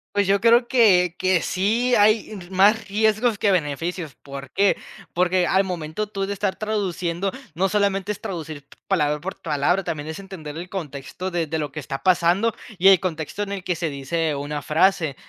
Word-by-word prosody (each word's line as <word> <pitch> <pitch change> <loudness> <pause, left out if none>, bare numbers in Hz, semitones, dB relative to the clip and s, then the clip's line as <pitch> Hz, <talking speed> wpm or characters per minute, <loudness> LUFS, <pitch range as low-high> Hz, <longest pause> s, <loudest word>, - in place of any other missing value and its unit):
Pues 205 0 +3
yo 200 +1 +3
creo 235 +2 +5
que 185 -9 +4
que 185 -2 +2
sí 225 +9 0
hay 215 +1 +3
más 205 +3 +3
riesgos 215 +2 +2
que 205 - +2
beneficios, 165 -2 -2
¿por 140 0 -9
qué? 200 +5 +2 0.4
Porque 180 0 +2
al 190 +1 +3
momento 180 +2 -4
tú 195 -1 -3
de 200 - -3
estar 200 -1 -1
traduciendo, 195 -4 -2 0.2
no 190 +4 +1
solamente 200 0 0
es 210 - -6
traducir 155 -5 -6 0.2
palabra 150 -6 +1
por 185 +5 -6
palabra, 165 +5 +1
también 150 -3 -4
es 160 - -5
entender 170 -6 -8
el 175 +2 -7
contexto 170 0 -5
de 170 -3 -1
de 160 +1 -2
lo 145 -2 -3
que 150 - -6
está 135 0 -5
pasando 185 +5 +3 0.3
y 190 - +5
el 190 -3 +8
contexto 170 +2 -3
en 200 - -6
el 195 -2 -4
que 180 - -1
se 165 0 -2
dice 150 +3 -2
una 145 +1 -4
frase, 160 -2 +2
185 Hz, 190 wpm, -23 LUFS, 160-200 Hz, 0.4 s, el